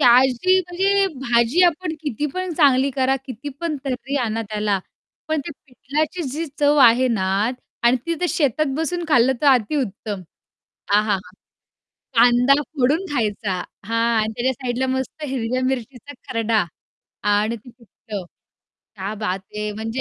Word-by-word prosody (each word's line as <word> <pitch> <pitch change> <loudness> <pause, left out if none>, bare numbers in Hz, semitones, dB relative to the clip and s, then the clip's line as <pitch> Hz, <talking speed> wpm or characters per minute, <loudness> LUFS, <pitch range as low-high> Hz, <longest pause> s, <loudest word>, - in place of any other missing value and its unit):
ते - - +3
अशी 260 +9 +5
म्हणजे 385 +3 +1
भाजी 240 +6 +3
आपण 345 -1 +2
किती 295 -2 -2
पण 370 -1 -2
चांगली 275 -3 +4
करा 265 0 +1
किती 260 +2 -7
पण 335 -3 -1
तर्री 270 +1 -3
आणा 225 -4 -1
त्याला, 210 -2 -1 0.5
पण 315 -1 +1
ते - - -5 0.2
पिठल्याची 300 +6 -3
जी 305 +6 -3
चव 290 0 +4
आहे 245 +2 +5
ना 215 -6 0 0.6
आणि 240 +2 +5
ती 335 - 0
ते 355 - +1
शेतात 305 -1 +1
बसून 340 +2 -2
खाल्लं 255 -3 +5
तर 295 - +1
अति 260 0 +4
उत्तम. 205 -6 -3 0.7
आहाहा! 210 -1 +3 1.0
कांदा 245 +3 +6
फोडून 290 +5 0
खायचा, 210 -6 -1 0.3
हां 230 0 -1 0.2
आणि 215 +1 -1
त्याच्या 255 +2 +1
साईडला 255 0 -2
मस्त 260 +4 -3
हिरव्या 255 -2 -2
मिरचीचा 260 +1 -4 0.2
खर्डा 225 -3 +1 0.7
आणि 215 +3 +1
ते 235 +3 -14
पिठलं. 220 -3 -9 0.7
क्या 200 +1 -4
बात 200 -3 -2 0.2
है. 210 0 -2
म्हणजे 225 +4 -4
255 Hz, 145 wpm, -21 LUFS, 225-295 Hz, 1.0 s, कांदा